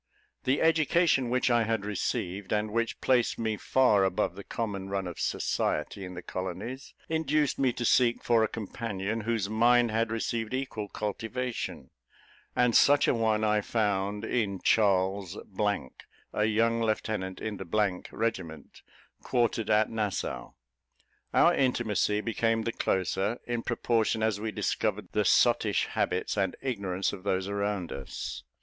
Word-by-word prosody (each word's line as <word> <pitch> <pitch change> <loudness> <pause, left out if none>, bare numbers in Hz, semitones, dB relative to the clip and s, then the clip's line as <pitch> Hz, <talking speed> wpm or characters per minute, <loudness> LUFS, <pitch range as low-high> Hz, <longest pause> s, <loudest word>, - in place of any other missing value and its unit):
The 130 +4 +2
education 160 -4 +3
which 125 0 +2
I 120 -1 +4
had 110 -2 -1
received, 100 -1 -3
and 105 0 0
which 115 +1 -1
placed 125 -2 +2
me 110 -1 -1
far 105 -3 +3
above 95 -1 0
the - - -9
common 100 -4 -4
run 100 -1 -2
of 90 -2 -6
society 100 - -1
in 90 -1 -7
the 90 - -7
colonies, 95 +10 -6
induced 155 -3 +1
me 130 -2 +3
to 120 - -3
seek 120 0 +3
for 115 -2 +3
a - - +2
companion 110 0 -4
whose 110 -2 -1
mind 120 +2 +4
had 115 +1 +1
received 115 +1 -2
equal 130 -6 -4
cultivation; 115 +5 -4 0.6
and 125 -2 +3
such 145 0 +5
a - - +4
one 110 -2 +1
I 105 0 +3
found 105 -1 -1
in 105 -5 -1
Charles, 95 -2 +2 1.0
a 105 - +1
young 115 +1 +2
lieutenant 110 -4 -2
in 110 -2 -4
the 95 0 -1
regiment, 85 -10 -4 0.4
quartered 120 -3 0
at 110 0 +3
Nassau. 105 -4 -3 0.8
Our - - +5
intimacy 110 -5 +1
became 115 0 0
the 115 - -1
closer, 95 +3 0
in 120 -1 -2
proportion 115 -2 0
as 110 -2 +1
we 110 +1 -3
discovered - - -1
the - - +1
sottish - - +3
habits 90 +3 -1
and 95 -2 0
ignorance 100 -8 -2
of 95 - -7
those 95 -1 -1
around 100 -3 -2
us. 70 -1 -6
110 Hz, 145 wpm, -29 LUFS, 100-120 Hz, 1.0 s, such